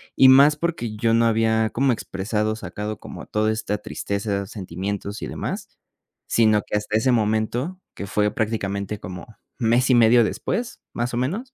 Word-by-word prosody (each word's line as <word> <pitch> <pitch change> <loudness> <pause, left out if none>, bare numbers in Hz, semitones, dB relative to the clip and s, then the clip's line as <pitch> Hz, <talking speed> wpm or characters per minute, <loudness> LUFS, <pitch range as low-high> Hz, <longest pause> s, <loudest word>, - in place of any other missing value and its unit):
Y 130 - +7
más, 140 +3 +7
porque 150 -9 -3
yo 115 +1 +2
no 115 0 +4
había 110 -1 +2
como 135 +4 +1
expresado, 105 +1 -2
sacado 105 -1 -5
como - - -9
toda 110 +1 +1
esta 110 -1 -2
tristeza, 100 -1 -3
sentimientos 100 +1 -5
y - - -4
demás, - - -5 0.6
sino 110 -2 +3
que - - -1
hasta 105 +1 -1
ese 125 +4 +2
momento, 115 - 0 0.2
que 100 - -6
fue 105 +1 +1
prácticamente 100 -2 -2
como 90 -1 -8 0.3
mes 120 +2 +2
y 130 - +6
medio 120 0 +6
después, 230 - -3
más 120 +1 -2
o 120 - -1
menos, 200 - -2
110 Hz, 165 wpm, -23 LUFS, 105-120 Hz, 0.6 s, Y